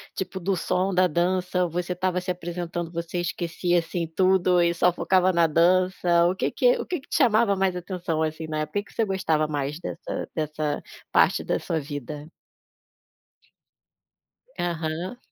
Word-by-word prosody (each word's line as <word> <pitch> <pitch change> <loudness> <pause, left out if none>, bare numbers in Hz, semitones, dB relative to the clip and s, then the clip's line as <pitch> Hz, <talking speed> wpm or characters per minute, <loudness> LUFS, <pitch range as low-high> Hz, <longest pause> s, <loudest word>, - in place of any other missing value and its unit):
tipo, 190 0 -4
do 190 +2 0
som 185 +3 0
da 185 0 +4
dança? 180 +2 0
Você 180 +2 -2
estava 180 0 0
se 185 - -7
apresentando, 175 -1 -4
você 170 +1 -4
esquecia, 175 0 0
assim, 170 +1 -3
tudo 185 +1 +3
e 170 0 +3
só 180 +1 +3
focava 185 +1 +3
na 170 -1 +4
dança? 175 +1 +3
O 180 - 0
que - - -1
que - - +3
o - - -3
que 355 -4 -3
que - - -22
chamava 230 -6 +4
mais 190 -1 +1
atenção, 175 -3 -3
assim, 160 0 -3
na 155 0 -3
época, 155 +7 -2
o - - -16
que - - -18
você 225 - +1
gostava 170 -6 0
mais 145 0 -3
dessa 175 - -5
dessa 155 -1 -2 0.3
parte - - +4
da - - +1
sua 165 - -2
vida? 145 +1 -7 2.3
Aham. 170 +5 -3
175 Hz, 165 wpm, -25 LUFS, 165-185 Hz, 2.3 s, da